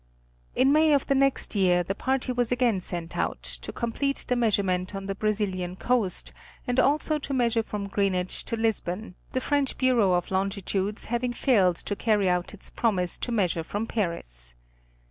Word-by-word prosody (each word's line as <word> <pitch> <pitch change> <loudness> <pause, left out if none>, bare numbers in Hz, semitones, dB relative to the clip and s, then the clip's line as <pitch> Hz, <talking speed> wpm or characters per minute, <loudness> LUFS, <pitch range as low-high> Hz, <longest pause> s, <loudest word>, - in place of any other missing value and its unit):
In 270 +2 +4
May 310 0 +5
of 275 - +1
the 275 - +2
next 275 0 +3
year, 180 -3 +3
the 190 - -2
party 260 +4 -1
was 245 -1 0
again 240 -6 +2
sent 170 -2 -5
out, - - -2
to - - -5
complete 275 +4 -1
the 250 - +1
measurement 195 -5 +1
on 195 0 -5
the 195 - -2
Brazilian 195 -4 -1
Coast, 225 -3 -1 0.3
and 245 -1 +1
also 300 +3 +2
to 280 -1 -5
measure 235 -2 +2
from 210 -2 -5
Greenwich 190 -2 -1
to - - -2
Lisbon, 220 -3 -1 0.2
the 255 - +1
French 285 0 0
Bureau 240 -8 +3
of 175 +1 -1
Longitudes 195 +1 -1
having 240 +1 -1
failed 200 -9 +3
to 205 - -3
carry 210 -2 +2
out 180 0 0
its 205 - -6
promise 185 -6 0
to 245 - -3
measure 180 -7 +1
from 205 +6 -3
Paris. - - -3
210 Hz, 175 wpm, -26 LUFS, 185-245 Hz, 0.3 s, May